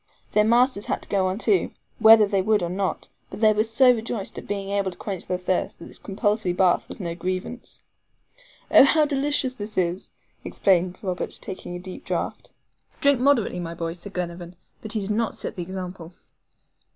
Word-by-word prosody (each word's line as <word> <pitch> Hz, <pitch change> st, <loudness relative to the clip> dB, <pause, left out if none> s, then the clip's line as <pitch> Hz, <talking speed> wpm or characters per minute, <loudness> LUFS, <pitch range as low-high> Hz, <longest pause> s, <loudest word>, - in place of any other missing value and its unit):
Their 210 Hz, -, +4 dB
masters 235 Hz, -1 st, +2 dB
had -, -, -2 dB
to -, -, -11 dB
go 190 Hz, -2 st, +1 dB
on 185 Hz, +1 st, -2 dB
too, 375 Hz, -, +1 dB, 0.3 s
whether 220 Hz, -1 st, +8 dB
they 200 Hz, -1 st, 0 dB
would 210 Hz, -1 st, +2 dB
or 170 Hz, -, -2 dB
not 190 Hz, +1 st, -2 dB, 0.2 s
but -, -, -9 dB
they 215 Hz, -1 st, +5 dB
were 215 Hz, +1 st, +2 dB
so 240 Hz, +3 st, +4 dB
rejoiced 225 Hz, -3 st, -5 dB
at -, -, -12 dB
being 200 Hz, -1 st, -3 dB
able 200 Hz, -1 st, 0 dB
to 180 Hz, -, -11 dB
quench 195 Hz, -4 st, -5 dB
their 180 Hz, -, -1 dB
thirst, 180 Hz, 0 st, -2 dB
that 170 Hz, -, -11 dB
this -, -, +2 dB
compulsory 205 Hz, -1 st, -1 dB
bath 180 Hz, -1 st, +2 dB
was -, -, -9 dB
no 170 Hz, -4 st, -3 dB
grievance. 185 Hz, +7 st, -5 dB, 0.9 s
"Oh, -, -, +9 dB
how 300 Hz, +2 st, +4 dB
delicious 285 Hz, -2 st, 0 dB
this 210 Hz, -3 st, -8 dB
is!" 180 Hz, 0 st, -1 dB, 0.3 s
exclaimed 185 Hz, -1 st, +1 dB
Robert, 185 Hz, -2 st, -2 dB
taking 185 Hz, -1 st, -7 dB
a -, -, -5 dB
deep 185 Hz, +1 st, -9 dB
draught. -, -, -4 dB, 0.5 s
"Drink 280 Hz, -2 st, +4 dB
moderately, 250 Hz, -9 st, +2 dB
my 170 Hz, -1 st, -5 dB
boy," 165 Hz, -1 st, -3 dB
said 180 Hz, +3 st, -9 dB
Glenarvan; 175 Hz, 0 st, -5 dB, 0.3 s
but 220 Hz, -, -5 dB
he 215 Hz, -, -1 dB
did 200 Hz, +1 st, -3 dB
not 220 Hz, 0 st, -1 dB
set -, -, -2 dB
the 180 Hz, -, -5 dB
example. 180 Hz, -1 st, -7 dB
195 Hz, 195 wpm, -24 LUFS, 180-220 Hz, 0.9 s, Oh